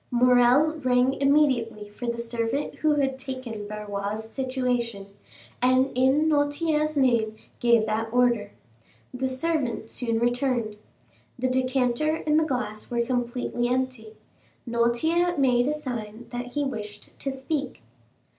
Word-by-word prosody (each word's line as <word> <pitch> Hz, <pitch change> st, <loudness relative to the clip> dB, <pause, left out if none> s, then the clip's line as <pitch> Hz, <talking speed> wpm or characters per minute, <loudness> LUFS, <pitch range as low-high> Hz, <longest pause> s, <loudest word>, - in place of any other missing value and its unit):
Morrel 250 Hz, +5 st, +4 dB
rang 250 Hz, +1 st, +3 dB
immediately 260 Hz, -7 st, +2 dB
for 210 Hz, +4 st, -7 dB
the 235 Hz, 0 st, -1 dB
servant 235 Hz, +3 st, -2 dB
who 310 Hz, -1 st, +2 dB
had 270 Hz, -2 st, 0 dB
taken 255 Hz, -6 st, -6 dB
Barrois's 210 Hz, 0 st, -4 dB
situation, 245 Hz, -5 st, -2 dB, 0.5 s
and 255 Hz, +2 st, +3 dB
in 265 Hz, +5 st, +3 dB
Noirtier's 305 Hz, +1 st, +1 dB
name 235 Hz, -5 st, +2 dB, 0.2 s
gave 235 Hz, -2 st, +4 dB
that 220 Hz, +1 st, -2 dB
order. 240 Hz, -4 st, +2 dB, 0.6 s
The 260 Hz, +1 st, -1 dB
servant 260 Hz, -5 st, -2 dB
soon 230 Hz, -2 st, -1 dB
returned. 240 Hz, -2 st, 0 dB, 0.6 s
The 255 Hz, +1 st, 0 dB
decanter 260 Hz, +3 st, +1 dB
and 305 Hz, 0 st, +4 dB
the -, -, +2 dB
glass 215 Hz, -7 st, -3 dB
were 235 Hz, -1 st, 0 dB
completely 245 Hz, -1 st, -1 dB
empty. 250 Hz, -3 st, -2 dB, 0.5 s
Noirtier 315 Hz, +10 st, +1 dB
made 250 Hz, -2 st, +3 dB
a -, -, +2 dB
sign 240 Hz, -5 st, -6 dB
that 245 Hz, 0 st, -4 dB
he 290 Hz, -, 0 dB
wished 210 Hz, -5 st, -6 dB
to 275 Hz, -, -2 dB
speak. 270 Hz, -, -4 dB
250 Hz, 125 wpm, -26 LUFS, 230-270 Hz, 0.6 s, Morrel